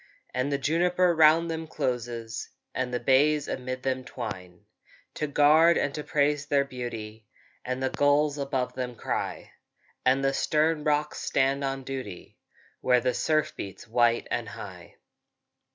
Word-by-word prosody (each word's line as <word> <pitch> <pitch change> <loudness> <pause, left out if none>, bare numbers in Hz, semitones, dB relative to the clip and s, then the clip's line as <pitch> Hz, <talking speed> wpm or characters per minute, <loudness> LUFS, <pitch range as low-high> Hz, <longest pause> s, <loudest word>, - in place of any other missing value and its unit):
And 130 +3 -1
the 140 - +1
juniper 175 +5 +2
round 160 +1 +5
them 160 0 -4
closes, 120 -5 -3 0.2
And 125 - -2
the 125 - -1
bays 145 +2 +3
amid 130 0 -4
them 130 -1 -1
twine, 90 -9 -7 0.5
To 150 - -2
guard 155 +4 +5
and 140 - 0
to 150 - -4
praise 145 -3 +1
their 140 -1 +2
beauty; 115 -4 -7 0.4
And 130 +1 -3
the 130 - 0
gulls 145 0 +2
above 135 -2 -2
them 125 -1 -4
cry, - - -4 0.5
And 130 +2 +3
the 135 0 +2
stern 155 +2 +1
rocks 150 0 0
stand 135 +1 +1
on 135 0 -2
duty, 130 -9 -7 0.4
Where 125 -1 +3
the 125 +1 +1
surf 155 +4 0
beats 100 +4 -8
white 120 +1 +2
and - - -2
high. - - -10
135 Hz, 150 wpm, -27 LUFS, 125-150 Hz, 0.5 s, round